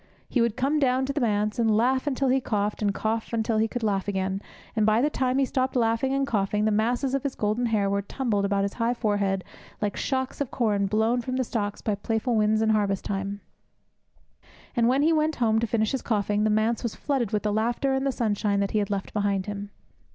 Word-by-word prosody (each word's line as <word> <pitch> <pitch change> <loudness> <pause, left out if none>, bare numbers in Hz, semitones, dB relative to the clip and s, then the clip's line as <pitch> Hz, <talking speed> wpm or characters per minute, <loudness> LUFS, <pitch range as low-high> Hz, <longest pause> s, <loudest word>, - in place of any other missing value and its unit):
He 245 - +1
would 235 -1 +1
come 275 +4 +1
down 260 -1 +2
to 275 - -2
the 290 - -1
Manse 210 -1 0
and 220 -2 +3
laugh 260 +4 +2
until 270 -1 +1
he 265 +1 +3
coughed, 210 -3 -1
and 205 -1 +2
cough 220 +3 -2
until 220 -1 +1
he 220 - +2
could 240 +1 -5
laugh 200 -3 0
again, 190 -1 -1 0.3
and, 220 - +2
by 215 +1 +4
the 295 +4 +2
time 255 -2 0
that - - +3
he - - +3
stopped 260 0 -1
laughing 230 +2 +1
and 275 0 +1
coughing, 210 -4 0
the 220 - +2
masses 240 +5 +1
of 275 - +1
his 280 -1 -3
golden 215 +3 0
hair 210 -3 +1
were 200 0 0
tumbled 210 -1 -1
about 200 0 +1
his 200 - -2
high 235 +2 +2
forehead 205 -4 0 0.4
like 205 -2 -1
shocks 260 0 -2
of 280 - -1
corn 205 -5 +1
blown 220 +4 +1
from 255 +2 -4
the 260 - +1
stocks 205 -4 -3
by 215 - 0
playful 225 +4 -1
winds 215 0 +2
in 220 - +2
harvest 200 -3 0
time; 200 0 -3 1.3
and 235 -2 +3
when 265 +3 +3
he 325 +2 +4
went 310 0 +1
home 220 -2 +2
to 230 - 0
finish 220 -1 +1
his 270 - -2
coughing, 210 -1 0
the - - +3
Manse 215 +2 +1
was 235 -3 -3
flooded 265 -7 -1
with 210 - 0
the 210 -1 0
laughter 240 +5 0
and 265 0 0
the 275 - +1
sunshine 210 -4 0
that 200 -1 0
he 215 - +1
had 205 - -1
left 200 -1 -3
behind 200 -2 0
him. 205 -1 -5
220 Hz, 240 wpm, -26 LUFS, 205-255 Hz, 1.3 s, by